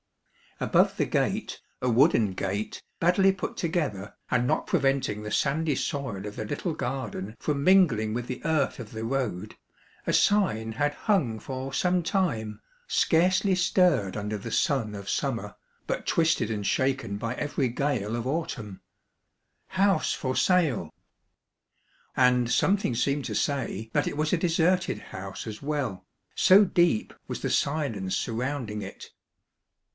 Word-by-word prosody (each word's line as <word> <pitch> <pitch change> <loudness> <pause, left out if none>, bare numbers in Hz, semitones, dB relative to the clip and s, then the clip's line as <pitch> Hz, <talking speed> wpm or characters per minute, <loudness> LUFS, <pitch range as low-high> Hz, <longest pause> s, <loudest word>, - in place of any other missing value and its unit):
Above - - +2
the - - +2
gate, - - -1 0.2
a 125 - +1
wooden 115 - +4
gate, 100 +3 -3 0.2
badly 190 +3 +4
put 190 - -5
together, 150 - -2
and 125 -1 +1
not 155 - 0
preventing 135 - +1
the 105 0 -6
sandy 150 +3 +1
soil 130 - -3
of 105 0 -6
the 110 - -4
little 165 - -3
garden 125 -7 -4
from 140 -2 -1
mingling 150 - +4
with 120 +1 -3
the - - -5
earth 155 -5 +1
of 115 -3 -8
the 110 0 -5
road, 115 -6 -2 0.5
a - - 0
sign 115 - +2
had 145 +4 0
hung 145 - 0
for 130 +3 -5
some 180 +3 +2
time, 130 - -1 0.3
scarcely 185 - +3
stirred 175 - +2
under 105 0 -3
the 100 - -7
sun 120 -7 +1
of 100 -1 -7
summer, - - -2 0.3
but - - -2
twisted 165 -8 +2
and 105 -2 -3
shaken 130 -6 0
by 115 +3 -3
every 145 -1 -1
gale 120 -4 -1
of 120 0 -3
autumn: 130 - -4 0.9
House 195 +1 +2
for 130 -2 -2
Sale! 155 - +2 1.2
And 125 -2 +3
something 190 +4 +2
seemed 140 +3 0
to - - -3
say 130 -6 -1
that - - +1
it - - -3
was 155 +2 0
a - - +4
deserted 175 +1 +1
house - - -8
as 110 -1 -7
well, 140 -11 -3 0.3
so 200 +3 +7
deep 175 - +2
was - - -5
the - - -1
silence 115 -11 0
surround 125 +3 -2
ing 105 0 -4
it. 95 - -10
135 Hz, 150 wpm, -27 LUFS, 110-165 Hz, 1.2 s, so